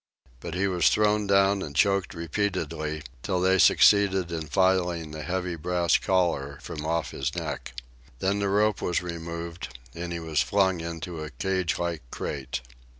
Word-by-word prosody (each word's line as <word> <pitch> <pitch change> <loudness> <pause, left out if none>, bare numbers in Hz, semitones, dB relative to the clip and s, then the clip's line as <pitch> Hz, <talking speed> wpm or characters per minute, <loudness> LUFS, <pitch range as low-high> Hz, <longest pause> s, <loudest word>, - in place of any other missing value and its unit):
But 85 +5 -6
he 95 +2 +1
was 90 -3 +3
thrown 105 -1 +2
down 100 0 +4
and 70 -5 -6
choked 100 +2 +2
repeatedly, 80 -3 -2 0.2
till 90 +7 -1
they 95 +1 +3
succeeded 95 -2 +5
in 80 -2 -4
filing 90 -1 +1
the 75 0 -6
heavy 90 +1 -2
brass 85 +1 +1
collar 85 -7 0
from 80 -4 -6
off 85 0 -1
his - - -3
neck. - - -4 0.4
Then 95 +8 0
the 100 -1 0
rope 105 0 +2
was 90 - 0
removed, 85 -4 -6 0.2
and 85 +4 -5
he 85 - -3
was 80 -2 0
flung 95 0 +2
into 85 0 -5
a 75 - -6
cagelike 85 -2 -1
crate. 65 0 -4
90 Hz, 155 wpm, -27 LUFS, 80-95 Hz, 0.4 s, succeeded